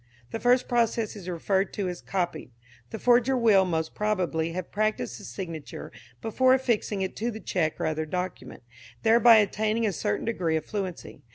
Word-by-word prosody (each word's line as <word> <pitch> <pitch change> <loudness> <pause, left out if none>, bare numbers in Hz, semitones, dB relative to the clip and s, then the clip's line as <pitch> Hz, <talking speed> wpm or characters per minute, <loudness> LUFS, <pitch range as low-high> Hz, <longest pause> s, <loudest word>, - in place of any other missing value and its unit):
The 225 - -3
first 245 +1 +3
process 230 -2 0
is 185 -3 -8
referred 190 +3 0
to 200 -3 -2
as 180 -1 -5
copied. 175 -7 -3 0.4
The - - -5
forger 250 +2 +3
will, 215 -5 +5
most 160 -3 -2
probably, 180 -6 -1
have 185 0 -5
practised 210 - -1
the - - -12
signature 160 +4 -7 0.3
before 255 +4 +4
affixing 220 -6 0
it 190 - -4
to 230 +3 -1
the 220 -2 -6
cheque 165 -7 -1
or - - -1
other 155 0 -1
document, 180 -5 -5 0.4
thereby 230 +1 +7
attaining 215 +2 +2
a 205 - 0
certain 105 - -2
degree 180 -8 0
of 155 -1 -2
fluency. 190 -4 -5
200 Hz, 175 wpm, -27 LUFS, 175-225 Hz, 0.4 s, thereby